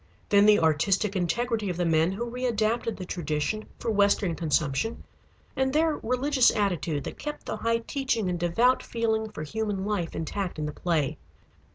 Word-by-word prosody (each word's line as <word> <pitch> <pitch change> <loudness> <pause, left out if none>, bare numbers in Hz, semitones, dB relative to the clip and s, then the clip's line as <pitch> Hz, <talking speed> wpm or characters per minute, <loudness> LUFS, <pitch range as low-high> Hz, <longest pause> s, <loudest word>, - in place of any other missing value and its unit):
Then 205 0 +6
the 210 -1 +7
artistic 190 +6 +2
integrity 215 +4 0
of 175 - -3
the 175 - 0
men 165 +1 +3
who 235 +5 -3
readapted 230 -2 -1
the 185 - -6
tradition 170 +5 -2
for 230 - -2
western 200 -3 +2
consumption, 155 +5 -1 0.5
and 265 0 +1
their 310 +1 +2
religious 255 +2 +2
attitude 175 -8 0
that - - -7
kept 295 0 -6
the - - -3
high 230 0 0
teaching 260 -7 -1
and 180 -1 -1
devout 230 +10 +3
feeling 220 -1 -1
for 155 -8 -7
human 205 +3 -3
life 200 -6 -2
intact 180 +3 -3
in 155 - -2
the 150 - -4
play. 155 -4 -1
205 Hz, 170 wpm, -27 LUFS, 170-230 Hz, 0.5 s, the